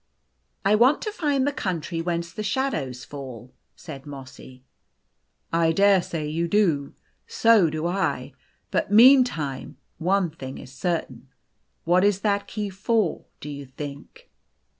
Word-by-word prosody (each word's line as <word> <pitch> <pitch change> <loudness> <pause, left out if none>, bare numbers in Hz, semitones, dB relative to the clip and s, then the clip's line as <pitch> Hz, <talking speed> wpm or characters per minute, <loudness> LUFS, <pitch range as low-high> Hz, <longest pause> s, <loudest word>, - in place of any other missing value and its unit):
"I 200 - +4
want 245 +7 +5
to 425 - -3
find 290 -9 0
the 285 - +1
country 170 - -3
whence 170 0 -3
the - - -5
shadows 200 - -2
fall," 130 -4 -9 0.2
said 140 -3 -10
Mossy. 130 -2 -11 0.4
" - - -41
I 165 - +4
dare 195 +2 +4
say 160 -3 -4
you 165 +3 -1
do. 165 -8 +1 0.3
So 225 -7 +4
do 155 +1 -3
I. 185 +2 -1 0.4
But - - -1
meantime, 225 - +4 0.2
one 185 0 +1
thing 135 -4 -8
is 125 - -11
certain. 135 -6 -3 0.6
What 180 +3 +3
is 200 -1 +2
that 200 -1 0
key 210 -2 -4
for, 200 -1 0
do - - -9
you 140 -1 -8
think 140 +2 -10
170 Hz, 140 wpm, -24 LUFS, 145-205 Hz, 0.6 s, want